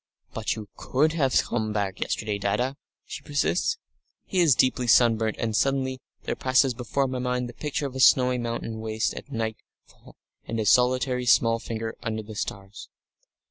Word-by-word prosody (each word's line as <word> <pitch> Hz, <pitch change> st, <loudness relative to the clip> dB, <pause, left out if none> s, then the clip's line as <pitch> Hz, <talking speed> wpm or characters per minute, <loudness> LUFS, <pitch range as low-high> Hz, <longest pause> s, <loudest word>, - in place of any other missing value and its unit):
"But 110 Hz, -1 st, -2 dB
you 110 Hz, -2 st, -8 dB
could 155 Hz, +5 st, +1 dB
have 135 Hz, -6 st, +2 dB
come 110 Hz, -2 st, -2 dB
back 100 Hz, -3 st, -2 dB
yesterday, 105 Hz, -1 st, -2 dB
Dadda," 125 Hz, +7 st, 0 dB, 0.3 s
she -, -, -7 dB
persists. 140 Hz, -, 0 dB, 0.5 s
He 185 Hz, -, -1 dB
is 160 Hz, -7 st, +5 dB
deeply 125 Hz, -1 st, +2 dB
sunburnt, 115 Hz, -2 st, +4 dB
and 110 Hz, -2 st, -2 dB
suddenly 130 Hz, 0 st, 0 dB, 0.2 s
there -, -, -2 dB
passes 130 Hz, 0 st, +2 dB
before 125 Hz, +3 st, -1 dB
my 130 Hz, -1 st, -3 dB
mind 125 Hz, 0 st, -1 dB
the 120 Hz, -, -9 dB
picture 150 Hz, +3 st, -3 dB
of 135 Hz, -2 st, -5 dB
a -, -, -4 dB
snowy 125 Hz, -1 st, +5 dB
mountain 115 Hz, -1 st, -4 dB
waste 110 Hz, 0 st, -1 dB
at 140 Hz, -, -10 dB
night 110 Hz, -3 st, -2 dB, 0.3 s
fall -, -, -19 dB, 0.3 s
and 115 Hz, -, -3 dB
a 110 Hz, -, -1 dB
solitary 125 Hz, +2 st, +3 dB
small 115 Hz, -1 st, +4 dB
figure 115 Hz, 0 st, -4 dB
under 110 Hz, -1 st, -3 dB
the 110 Hz, +1 st, -10 dB
stars.... 100 Hz, -1 st, -6 dB
120 Hz, 175 wpm, -26 LUFS, 110-130 Hz, 0.5 s, is